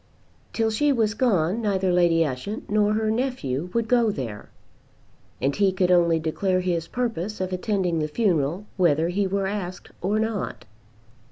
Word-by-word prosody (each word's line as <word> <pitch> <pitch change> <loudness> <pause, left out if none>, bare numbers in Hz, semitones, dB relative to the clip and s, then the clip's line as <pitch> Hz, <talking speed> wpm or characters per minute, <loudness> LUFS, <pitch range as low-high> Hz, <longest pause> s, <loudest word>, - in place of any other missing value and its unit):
Till 225 -1 0
she 290 +7 +2
was 220 -5 +1
gone 215 -4 +1
neither 190 -4 +1
Lady 170 -2 +4
Ushant 150 - -5
nor 210 0 +3
her 215 0 +1
nephew 180 - -2
would 230 +1 0
go 235 -1 +3
there, 120 - -5 0.9
and 140 +1 0
he 200 -2 +3
could 185 -1 +1
only 170 -2 +4
declare 185 +4 0
his 170 -3 -1
purpose 220 -5 -3
of 185 0 -2
attending 185 -3 0
the 155 - 0
funeral 170 -1 0
whether 165 -2 +3
he 195 +2 0
were 195 +1 -1
asked 190 -2 -5
or 200 +4 0
not. 220 -2 -2
190 Hz, 160 wpm, -24 LUFS, 170-215 Hz, 0.9 s, Lady